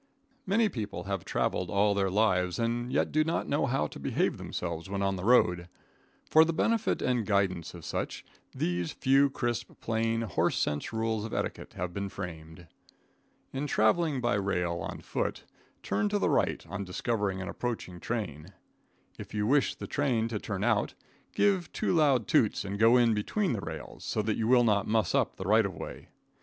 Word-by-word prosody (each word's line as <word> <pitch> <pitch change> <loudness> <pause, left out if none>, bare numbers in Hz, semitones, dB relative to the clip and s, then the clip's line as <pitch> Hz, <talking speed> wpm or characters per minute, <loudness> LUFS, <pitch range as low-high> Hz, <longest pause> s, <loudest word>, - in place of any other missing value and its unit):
Many 220 +4 +3
people 110 - -5
have 100 -2 -3
traveled 90 -1 -1
all 100 +1 +3
their 100 -1 +1
lives 90 -3 +2
and 120 +1 -1
yet - - +1
do 155 +1 +3
not 160 +2 -1
know 145 -1 +1
how 120 - +1
to - - -8
behave - - 0
themselves 85 0 -4
when 100 0 -2
on 95 0 +1
the 90 - -6
road. 90 -7 +3 0.6
For 160 - +7
the 165 - 0
benefit 225 +6 +1
and 125 -2 +1
guidance 95 -5 0
of 85 - -10
such, - - -4 0.3
these 90 -1 -2
few 135 +1 +4
crisp, 120 -3 -3
plain, 115 0 0
horse 110 - 0
sense 75 0 -1
rules 110 -1 -1
of 110 - -5
etiquette - - -4
have 90 0 -4
been 100 +1 -3
framed. 85 -3 -8 0.9
In 135 +2 -2
traveling 140 +4 +2
by 120 -2 +1
rail 90 -4 0
on - - -5
foot, - - -3 0.4
turn 205 -2 0
to 205 - +1
the - - +1
right - - +1
on 100 +4 -5
discovering 100 +1 -1
an 95 - -5
approaching 110 -7 -4
train. 95 -6 -4 0.7
If - - -8
you 105 0 0
wish 140 +5 +2
the - - -7
train 125 -6 0
to 110 -2 -3
turn 100 -1 -4
out, 110 -2 +1 0.4
give 195 -5 +2
two - - 0
loud 140 - +3
toots - - +2
and 100 +1 -4
get 110 - +6
in 120 -1 +5
between 175 - 0
the 105 - -3
rails, 80 -4 -8
so 110 - -1
that 110 +1 0
you 110 - -1
will 125 0 +6
not 105 -4 +2
muss 110 0 +1
up - - +1
the 95 - -6
right 110 +3 +5
of 100 -3 -4
way. - - -8
110 Hz, 190 wpm, -29 LUFS, 95-125 Hz, 0.9 s, For